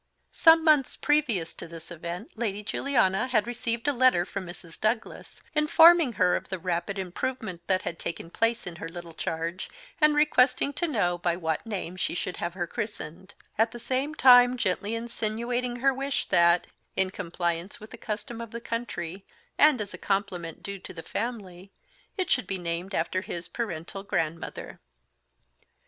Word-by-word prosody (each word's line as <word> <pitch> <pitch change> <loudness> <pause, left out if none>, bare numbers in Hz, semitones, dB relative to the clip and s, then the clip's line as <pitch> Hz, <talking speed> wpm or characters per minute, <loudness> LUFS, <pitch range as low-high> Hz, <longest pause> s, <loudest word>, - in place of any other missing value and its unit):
Some 325 -1 +6
months 300 -4 +4
previous 235 - +1
to 170 - -8
this 165 +1 -10
event 170 +5 -6
Lady 210 -3 -2
Juliana 220 -3 +1
had 220 -5 +2
received 235 0 -2
a 290 - +3
letter 250 -9 +4
from 190 0 -6
Mrs. 175 -1 -10
Douglas, 220 +1 -2
informing 320 -1 +6
her 180 -3 +3
of - - -4
the 190 - -2
rapid 180 +3 -2
improvement 190 0 -4
that 185 -1 +2
had 165 - -4
taken 165 0 -5
place 230 +3 0
in 170 -1 -7
her 165 - -6
little 170 0 -9
charge, 165 +3 -4 0.3
and 300 -1 +5
requesting 280 -2 +3
to 345 - 0
know 180 - 0
by 175 -1 +1
what 160 +3 -2
name 185 -4 -4
she 175 - -1
should 180 0 -3
have 170 +1 -3
her 175 -2 -1
christened; 190 -3 -6 0.2
at 225 +1 +3
the 240 - -7
same 265 +5 -2
time 245 -2 +7
gently 205 0 -1
insinuating 235 +2 -2
her 270 +2 +2
wish 275 +1 -1
that, 170 0 +5 0.3
in 190 -1 +1
compliance 175 -1 -3
with 215 - -12
the - - -8
custom 225 +2 -5
of 230 - -7
the 235 - -6
country, 200 -6 -4 0.4
and 300 -4 +6
as 205 -1 -5
a - - -8
compliment 190 -5 -2
due 200 0 -5
to - - -9
the 165 - -7
family, 200 -5 -5 0.5
it 370 -2 -1
should 250 - +2
be 190 - -1
named 175 +2 -4
after 180 +3 0
his 175 -3 -6
paternal 195 -4 -4
grandmother. 165 -5 -3
200 Hz, 170 wpm, -27 LUFS, 175-245 Hz, 0.5 s, time